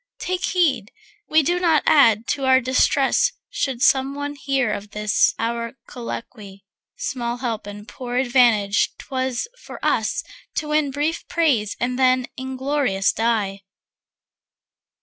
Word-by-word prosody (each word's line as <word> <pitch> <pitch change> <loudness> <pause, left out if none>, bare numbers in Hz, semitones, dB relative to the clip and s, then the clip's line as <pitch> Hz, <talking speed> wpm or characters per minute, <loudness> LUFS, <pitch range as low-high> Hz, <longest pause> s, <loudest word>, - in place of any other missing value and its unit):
Take 365 0 -2
heed 270 - +1 0.4
we 310 0 +4
do 350 +5 +1
not 330 -4 +3
add 230 -7 +5
to 275 -2 -1
our 260 0 +5
distress 260 +2 +2 0.2
Should 260 -2 -2
some 270 +1 +3
one 285 0 -4
hear 275 -5 -1
of 205 0 -6
this 210 0 +1
our 230 0 -2
colloquy. 215 -4 -8 0.3
Small 240 -1 -3
help 230 -4 -4
and 205 +1 -9
poor 245 -1 -6
advantage 240 -6 +3
'twere 260 -2 -3 0.3
for - - -10
us - - 0 0.3
To 300 - -2
win 300 -1 +2
brief 295 +4 -2
praise 265 - +1
and 250 +1 -1
then 255 -1 +3
inglorious 260 -6 0
die. 210 -4 -1
255 Hz, 130 wpm, -22 LUFS, 225-280 Hz, 0.4 s, add